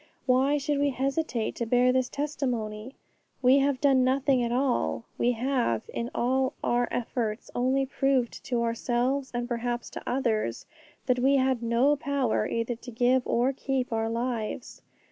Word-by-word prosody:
Why 265 +3 +3
should 285 0 -1
we 285 0 +2
hesitate 270 -2 -1
to 235 - -2
bear 250 +2 +4
this 255 -1 +1
testimony? 250 -5 -3 0.5
We 260 +2 +6
have 275 -1 +1
done 270 -2 +4
nothing 260 0 +2
at 235 -1 -1
all; 240 - 0
we 245 +1 +3
have, 240 - 0
in 235 0 -3
all 260 +2 +1
our 240 0 +1
efforts, 230 -2 -3
only 260 +2 +1
proved 265 -2 0
to 240 -2 0
ourselves, 245 +4 0
and 240 0 -3
perhaps 240 0 -3
to - - -7
others, 225 - -1 0.4
that 250 -1 +2
we 270 +3 +4
had 260 -2 +2
no 235 +5 +3
power 275 -6 0
either 230 +1 -2
to 245 - -11
give 245 +2 +2
or 250 +3 +2
keep 260 -2 -2
our 225 0 0
lives. 235 0 -3
250 Hz, 160 wpm, -27 LUFS, 235-270 Hz, 0.5 s, We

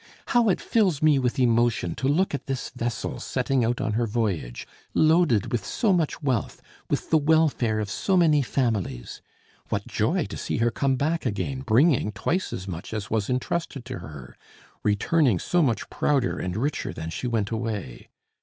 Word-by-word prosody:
How 240 -2 +4
it 185 - +2
fills 190 -10 +1
me 150 -3 +5
with 125 -2 -1
emotion 120 -7 +2
to 130 - -1
look 165 +7 +2
at 140 -2 -4
this 135 -1 -3
vessel 120 -2 -3
setting 130 0 0
out 120 +2 0
on 110 - -1
her 115 +1 0
voyage, 100 - -2 0.3
loaded 155 - +3
with 120 - -1
so 215 -5 +1
much 165 -4 -1
wealth, 130 -6 -1 0.3
with - - -2
the 160 - +5
welfare 145 -8 +2
of 105 - -2
so 185 - 0
many 155 -4 +4
families! 115 - -2 0.5
What - - -2
joy - - 0
to - - -7
see - - -3
her 120 +1 +2
come 135 +1 +1
back 155 +2 0
again, 130 +5 -3
bringing 130 -1 +3
twice 185 - -1
as 95 +1 -5
much 90 +4 -6
as 110 +2 -5
was 110 -3 0
intrusted 135 +1 -2
to 130 -1 -6
her, 70 -4 -10 0.5
returning 115 - +2
so 175 - +1
much 125 -8 0
prouder 135 -4 +1
and 90 +1 -3
richer 145 +6 -2
than 80 0 -6
she 125 - -3
went 110 -3 -1
away! 110 - -4
125 Hz, 180 wpm, -25 LUFS, 110-150 Hz, 0.5 s, me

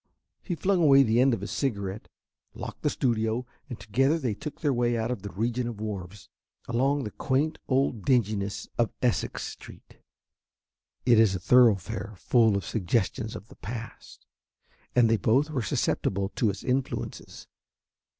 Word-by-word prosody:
He 175 - -3
flung 185 +3 +1
away 140 -3 +7
the 115 -1 +2
end 135 +1 +5
of 115 - -1
his 100 - -5
cigarette, 100 -6 -3 0.5
locked - - -7
the - - +1
studio, 115 0 0 0.2
and 120 - -7
together 135 +9 +1
they 130 -9 -1
took 145 +8 -7
their 145 -3 +2
way 120 -1 +1
out 115 +2 -1
of 125 - -3
the 100 - -6
region 120 +4 -2
of 115 -3 -6
wharves, 100 -3 -6 0.4
along 135 +4 +1
the 105 - -5
quaint 145 +8 -1
old 130 -5 +1
dinginess 105 -6 0
of 115 - +2
Essex 120 -3 0
Street. - - -11 1.1
It 120 -3 +6
is 105 -4 +4
a - - -3
thoroughfare 110 -3 +3
full 110 0 +3
of 100 - -4
suggestions 110 +2 -1
of 100 - -9
the - - -15
past, 115 +2 -8 0.7
and 120 -2 +5
they 115 0 +3
both 135 +9 +2
were 135 -4 -1
susceptible 100 -2 -1
to 110 +1 0
its 100 0 -5
influences. 130 +1 -3
115 Hz, 160 wpm, -27 LUFS, 105-130 Hz, 1.1 s, away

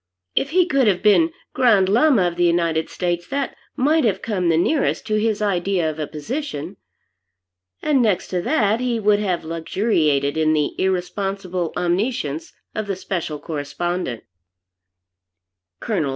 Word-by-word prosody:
If 275 - +1
he 360 +3 +3
could 270 -8 +2
have 190 -3 +1
been 320 +11 +5 0.2
Grand 220 -7 +4
Llama 235 +1 +4
of 175 -1 0
the 175 - +1
United 170 -2 +1
States, 175 -1 -2
that 275 -1 -2 0.2
might 305 +4 +2
have 215 -6 0
come 185 -6 0
the 165 - +3
nearest 275 - +1
to 215 -1 0
his 215 -1 0
idea 185 -3 +1
of 155 - -10
a 150 - -2
position. 180 - -5 1.1
And 285 -4 +3
next 210 -6 +1
to 180 -1 -1
that 215 - +1
he 245 -2 0
would 210 -1 +3
have 185 -5 -1
luxuriated 160 -4 0
in 155 0 +3
the 150 -2 0
irresponsible 185 -1 -2
omniscience 175 - -1 0.2
of 215 -1 -3
the 195 - -1
Special 175 -4 -3
Correspondent. 150 -2 -3 1.6
Col. 175 -11 -1
185 Hz, 150 wpm, -21 LUFS, 170-225 Hz, 1.6 s, been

